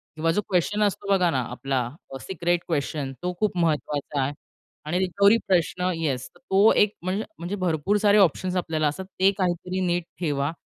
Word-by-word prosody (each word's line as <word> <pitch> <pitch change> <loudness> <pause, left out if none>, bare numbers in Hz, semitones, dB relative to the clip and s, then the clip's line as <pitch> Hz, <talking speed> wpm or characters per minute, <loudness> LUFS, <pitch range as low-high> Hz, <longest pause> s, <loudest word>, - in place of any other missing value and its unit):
किंवा 165 +1 +1
जो 210 - +1
क्वेस्चन 200 +3 +1
असतो 200 0 -1
बघा 185 -3 +4
ना 130 - 0
आपला 135 +2 -2 0.4
सिक्रेट 175 -1 -1
क्वेस्चन 145 -3 -2
तो 180 0 -1
खूप 210 -4 0
महत्त्वाचा 150 -3 0
आहे. 135 +2 -1 0.5
आणि 175 +4 0
रिकव्हरी 200 +4 +4
प्रश्न 180 0 +1
येस, 140 -6 -2
तो 205 -3 +3
एक 210 0 +3
म्हणज 185 +3 -1 0.2
म्हणजे 175 +4 -4
भरपूर 185 +1 0
सारे 205 0 +4
ऑप्शन्स 185 -1 +2
आपल्याला 160 -3 0
असतात 170 +6 -4
ते 190 +1 +5
काहीतरी 180 0 -1
नीट 175 0 0 0.2
ठेवा 145 -4 0
175 Hz, 170 wpm, -25 LUFS, 155-190 Hz, 0.5 s, ते